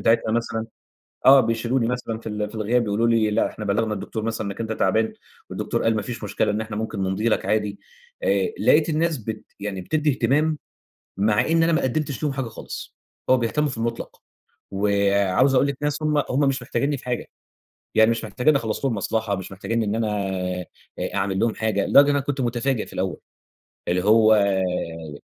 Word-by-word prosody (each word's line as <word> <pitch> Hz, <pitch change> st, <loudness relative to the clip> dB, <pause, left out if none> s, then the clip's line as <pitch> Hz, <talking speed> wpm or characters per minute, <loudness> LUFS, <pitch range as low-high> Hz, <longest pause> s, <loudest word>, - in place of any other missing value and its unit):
بتاعتها 115 Hz, -1 st, +2 dB
مثلًا، 115 Hz, -1 st, -1 dB, 0.6 s
آه، 135 Hz, +1 st, +9 dB
بيشيلوني 115 Hz, +1 st, 0 dB
مثلًا 125 Hz, -2 st, -3 dB
في 115 Hz, -, -7 dB
ال 105 Hz, 0 st, -3 dB
في 105 Hz, -, -14 dB
الغياب 115 Hz, +3 st, +1 dB
يقولوا 105 Hz, +2 st, +1 dB
لي 115 Hz, -2 st, +3 dB
لأ 105 Hz, +2 st, +2 dB
إحنا 105 Hz, -, -7 dB
بلّغنا 105 Hz, +2 st, 0 dB
الدكتور 110 Hz, +1 st, -5 dB
مثلًا 110 Hz, -1 st, -2 dB
إنّك 100 Hz, +3 st, -6 dB
أنت 110 Hz, -1 st, -2 dB
تعبان، 110 Hz, +2 st, +1 dB, 0.4 s
والدكتور -, -, -2 dB
قال 115 Hz, -1 st, +2 dB
ما 105 Hz, -, -1 dB
فيش 115 Hz, 0 st, -6 dB
مشكلة 105 Hz, 0 st, 0 dB
إن 105 Hz, +1 st, -1 dB
إحنا 110 Hz, -1 st, -5 dB
ممكن 110 Hz, -1 st, -3 dB
نمضي 95 Hz, +4 st, 0 dB
لك -, -, 0 dB
عادي، 105 Hz, -2 st, 0 dB, 0.4 s
آآ، -, -, +1 dB
لقيت 150 Hz, +1 st, +4 dB
الناس 160 Hz, -1 st, +1 dB
بت 110 Hz, -1 st, -6 dB, 0.2 s
يعني 100 Hz, -2 st, -4 dB
بتدّي 150 Hz, +10 st, 0 dB
اهتمام، 150 Hz, +3 st, +1 dB, 0.6 s
مع 105 Hz, +2 st, +2 dB
إن 165 Hz, 0 st, +3 dB
أنا 165 Hz, +1 st, +3 dB
ما 165 Hz, -, +2 dB
قدِّمتش 140 Hz, +2 st, -2 dB
ليهم 150 Hz, -2 st, 0 dB
حاجة 135 Hz, -3 st, -3 dB
خالص، 110 Hz, -, -8 dB, 0.3 s
هو 130 Hz, -, +7 dB
بيهتموا 130 Hz, +5 st, 0 dB
في 130 Hz, -, -5 dB
المُطلق، 115 Hz, 0 st, -4 dB, 0.5 s
وعاوز 100 Hz, +4 st, +2 dB
أقول 135 Hz, +2 st, +4 dB
لِك 140 Hz, -2 st, -3 dB
ناس 150 Hz, +1 st, -1 dB
هم، 150 Hz, -1 st, +2 dB
هم 130 Hz, -, 0 dB
مش 135 Hz, 0 st, 0 dB
محتاجينّي 140 Hz, +1 st, -1 dB
في -, -, -12 dB
حاجة، 125 Hz, -1 st, -3 dB, 0.7 s
يعني 110 Hz, +1 st, +6 dB
مش 115 Hz, -, -2 dB
محتاجينّي 125 Hz, +8 st, +2 dB
أخلّص 115 Hz, +1 st, -3 dB
لهم 125 Hz, -4 st, +1 dB
مصلحة، 110 Hz, 0 st, -1 dB
مش 95 Hz, 0 st, -7 dB
محتاجينّي 105 Hz, +4 st, -2 dB
إن 105 Hz, +1 st, -1 dB
أنا 115 Hz, -1 st, 0 dB, 0.9 s
آآ، -, -, -2 dB
أعمِل 95 Hz, -1 st, 0 dB
لهم 115 Hz, +1 st, +1 dB
حاجة، 110 Hz, -3 st, 0 dB
لدرجة 140 Hz, -, +7 dB
إن -, -, +1 dB
أنا -, -, +3 dB
كنت 140 Hz, 0 st, -2 dB
متفاجئ 120 Hz, 0 st, 0 dB
في -, -, -11 dB
الأول، 95 Hz, -1 st, -2 dB, 0.7 s
اللي 90 Hz, +1 st, +1 dB
هو 110 Hz, +1 st, +6 dB
آآ 90 Hz, -6 st, -1 dB
115 Hz, 195 wpm, -23 LUFS, 105-130 Hz, 0.9 s, آه